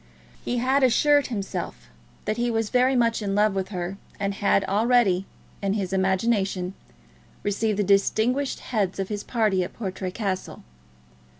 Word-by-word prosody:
He 245 - -1
had 260 +3 +2
assured 285 +3 +4
himself 195 - -5 0.4
that 215 - -1
he 240 0 +1
was 225 -2 -1
very 255 +1 +3
much 230 -2 +2
in 200 -1 -1
love 210 0 +3
with 190 -1 -2
her, 185 -1 -4 0.2
and 200 0 -1
had 195 0 +2
already, 205 -2 +2 0.3
in 200 -1 0
his 195 -3 -2
imagination, 190 -1 +1 0.7
received 205 +1 0
the 205 - +2
distinguished 220 +7 +1
heads 205 -6 -1
of 195 -1 -3
his 205 -1 -3
party 215 -6 +1
at - - -7
Portray 190 -3 -4
Castle. 190 -1 -4
205 Hz, 155 wpm, -25 LUFS, 190-235 Hz, 0.7 s, assured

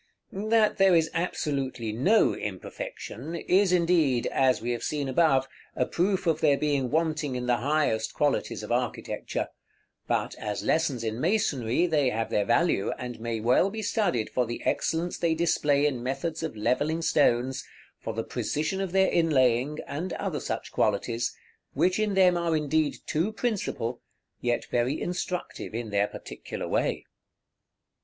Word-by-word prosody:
That 215 +2 +2
there 195 -2 +5
is 165 -1 +2
absolutely 135 -9 -2
no 175 - +3
imperfection, - - -6
is 185 +3 +2
indeed, 165 -8 +3
as 130 -1 +2
we 120 +2 -2
have 120 - -2
seen 145 -2 -2
above, 135 -1 +3 0.3
a 125 - +1
proof 190 +5 0
of 160 -2 +1
their 145 -3 +4
being 140 -4 0
wanting 155 -3 0
in 125 0 -3
the 120 -1 +2
highest 130 -5 0
qualities - - 0
of - - -6
architecture; - - -2 0.6
but, - - 0
as 105 -1 -3
lessons 140 -7 +1
in 110 +2 -3
masonry, 160 - +1
they 150 -6 +2
have 115 -1 -2
their 105 - +1
value, 120 - +2
and 125 -1 -6
may 115 0 -3
well 125 - +3
be 220 +2 -5
studied 180 - 0
for 125 -2 0
the 120 - -5
excellence 170 +2 0
they 165 -1 +2
display 150 -3 +2
in 135 -5 0
methods 155 +6 -3
of 160 -7 -4
levelling 145 +9 0
stones, 130 -3 +2 0.4
for 115 - -5
the 115 - -1
precision 150 - -2
of 190 -2 -3
their 190 0 +4
inlaying, 135 -3 +2
and 170 +5 -4
other - - -3
such - - -4
qualities, 115 +3 0 0.4
which 185 +3 +2
in 210 -2 0
them 185 -2 +5
are 170 -2 +1
indeed 155 0 +1
too 170 +8 0
principal, 195 - -2 0.4
yet 120 -1 -1
very 125 +4 +1
instructive 180 -8 -4
in 115 -2 -4
their 100 0 +2
particular - - -7
way. - - 0
150 Hz, 155 wpm, -27 LUFS, 120-175 Hz, 0.6 s, there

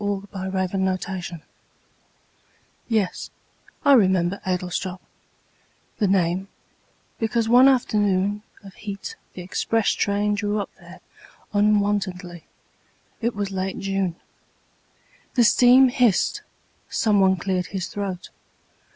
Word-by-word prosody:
Edward 205 -1 -3
Thomas 190 -1 -3 0.3
Adlestrop 180 -4 -6 1.5
YES, 215 -5 -1 0.6
I 285 - +7
remember 190 -5 +3
Adlestrop 180 0 -3 1.0
The 210 - +2
name 185 0 +1 0.7
because 225 0 0
one 250 +3 +7
afternoon 205 -6 +1 0.2
Of 195 -1 -12
heat 205 - -7 0.2
the 180 - -8
express 220 +4 0
train 205 +1 0
drew 205 0 -1
up 200 - -5
there - - -14 0.5
Unwontedly. 200 -4 0 0.8
It 235 0 -1
was 200 -1 -3
late 190 0 -3
June. 195 -3 -2 1.2
The 245 - +5
steam 250 +3 +6
hissed. 245 -6 +2 0.5
Someone 195 -3 +3
cleared 180 0 -2
his 190 -3 -4
throat. 195 -3 -5
200 Hz, 100 wpm, -23 LUFS, 185-210 Hz, 1.5 s, I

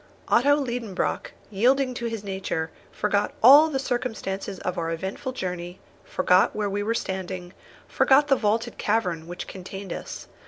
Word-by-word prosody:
Otto 285 +4 +5
Liedenbrock, 240 -8 -2 0.2
yielding 255 +6 +2
to 240 -1 -3
his 225 -3 -5
nature, 190 -5 -3 0.2
forgot 205 0 0
all 290 +6 +9
the 280 - -1
circumstances 225 -7 -3
of 180 - -2
our 165 -1 -2
eventful 190 - -4
journey, 180 -5 -5 0.2
forgot 180 +1 +2
where 210 -2 -1
we 205 +1 -1
were 225 +3 -1
standing, 185 -3 -4 0.3
forgot 280 +2 +4
the 275 - +5
vaulted 225 +1 -1
cavern 180 -7 0
which 175 +1 -6
contained 190 0 -7
us. - - -7
205 Hz, 150 wpm, -25 LUFS, 185-245 Hz, 0.3 s, all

